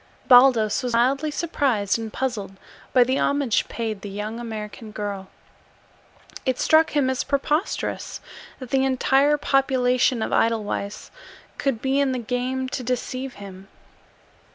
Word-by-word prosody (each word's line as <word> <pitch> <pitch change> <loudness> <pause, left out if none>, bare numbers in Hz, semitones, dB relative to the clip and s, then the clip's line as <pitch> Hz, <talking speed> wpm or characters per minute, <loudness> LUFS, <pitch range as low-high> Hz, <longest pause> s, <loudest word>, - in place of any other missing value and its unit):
Baldos 245 -4 +6
was 245 -2 -3
mildly 270 +6 +2
surprised 270 - 0
and 225 -1 -5
puzzled 225 -7 -3 0.4
by 250 - +6
the 260 +2 0
homage 280 -6 +1
paid 220 -4 -4
the 205 - -7
young 210 +3 -5
American 220 -1 -7
girl. 205 -2 -5 1.2
It 260 -2 0
struck 315 -1 +3
him 275 -3 +3
as 260 -1 0
preposterous 295 +5 -2 0.4
that 255 -3 -10
the 265 -1 +2
entire 270 +2 +3
population 255 -4 +2
of - - -3
Edelweiss 215 -3 -1 0.5
could 270 -5 -1
be 270 +1 +1
in 275 -2 +1
the - - -2
game 250 +2 -2
to 255 - -4
deceive 255 +1 -3
him. 195 -1 -11
250 Hz, 135 wpm, -23 LUFS, 220-270 Hz, 1.2 s, Baldos